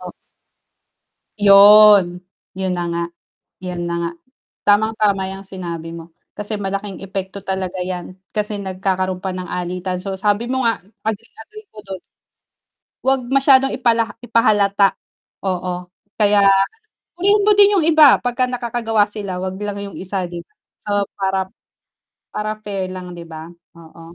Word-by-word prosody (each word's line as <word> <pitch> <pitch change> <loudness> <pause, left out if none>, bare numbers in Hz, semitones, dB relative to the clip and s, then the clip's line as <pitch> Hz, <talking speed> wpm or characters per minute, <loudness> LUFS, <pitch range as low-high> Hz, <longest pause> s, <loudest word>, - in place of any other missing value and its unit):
O - - -8 1.3
Yun, 200 -3 +7 0.3
'yun 190 0 -2
na 175 -1 -2
nga, 170 0 -1 0.6
'yun 175 -1 -4
na 170 - -3
nga, 170 - -1 0.6
tamang 220 +2 +3
tama 200 -3 +1
yung 195 +1 -8
sinabi 170 -4 -7
mo, 165 0 -11 0.2
kasi 210 +1 -5
malaking 200 0 -5
epekto 195 0 -6
talaga 190 -1 -3
'yan 185 0 -6 0.2
kasi 210 -1 -2
nagkakaroon 185 -1 -2
pa 190 -1 -4
ng 185 - -5
alitan 180 +1 -3
so 195 0 -5
sabi 205 +4 0
mo 260 +1 -1
nga 230 -3 +1 0.2
agree 220 +1 -4
agree 430 0 -14
ako 215 - -18
do'n. 190 -1 -7 1.1
'Wag 265 0 +3 0.2
masyadong 270 -1 +5
ipala 235 -3 +2 0.2
ipahalata, 205 -4 +3 0.6
oo 185 -1 -2 0.5
kaya 205 -1 +4 0.8
purihin 405 +4 +3
mo 425 - +5
din 405 0 +7
'yung 365 -6 +2
iba 310 -4 +6
'pag 245 -1 -2
nakakagawa 235 -3 0
sila 200 -4 -5
'wag 190 0 -4
lang 205 0 -4
'yung 200 -1 -8
isa 190 0 -3
'di 170 -1 -7
ba. - - -42 0.3
So, - - -8 0.3
para 195 -1 0 1.0
para 210 0 -2
fair 195 -2 -4
lang 180 -1 -8
'di 170 -1 -9
ba? 160 0 -9 0.3
Oo, 165 0 -15
195 Hz, 145 wpm, -19 LUFS, 185-215 Hz, 1.3 s, Yun